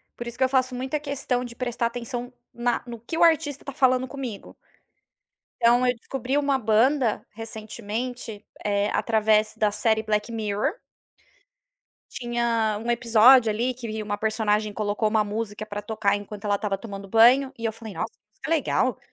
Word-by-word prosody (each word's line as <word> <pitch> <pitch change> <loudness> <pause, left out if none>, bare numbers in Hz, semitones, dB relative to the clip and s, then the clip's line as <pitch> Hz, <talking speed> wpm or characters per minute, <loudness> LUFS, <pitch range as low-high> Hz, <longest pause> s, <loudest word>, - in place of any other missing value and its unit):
Por 240 - -7
isso 235 - -7
que - - +2
eu 260 - +3
faço 255 -1 +1
muita 265 +4 -2
questão 275 -4 -2
de 240 -1 -8
prestar 240 -1 -1
atenção 245 +1 -5 0.2
na 240 0 -1
no 235 -1 -8
que 240 +9 -5
o - - +4
artista 315 -4 +2
está 280 - -7
falando 255 -1 +2
comigo. 255 -7 -7 1.1
Então, 240 +2 +4
eu 250 - +3
descobri 260 +2 -3
uma 280 -2 +2
banda, 235 +1 +2
recentemente, 225 +1 -6 0.2
eh, 205 0 +1
através 215 -1 +2
da 210 -1 +2
série 220 +1 +1
Black 210 +1 -1
Mirror. 215 - -1 1.4
Tinha 235 -3 0
um 240 - -1
episódio, 235 +1 +6
ali, 240 +4 -1
que 225 -3 -5
uma 205 -1 -3
personagem 215 -1 0
colocou 210 +1 0
uma 215 0 +2
música 210 0 -4
pra 205 -1 -5
tocar, 205 -1 0
enquanto 205 +1 -9
ela 205 -1 +2
estava 200 -1 -2
tomando 200 -2 -8
banho, 245 +6 +5
e 230 - -7
eu 225 - 0
falei: 220 -2 -9
"Nossa, - - -3
que - - -38
música - - -39
que - - -3
legal". 260 -5 +1
230 Hz, 175 wpm, -25 LUFS, 215-250 Hz, 1.4 s, episódio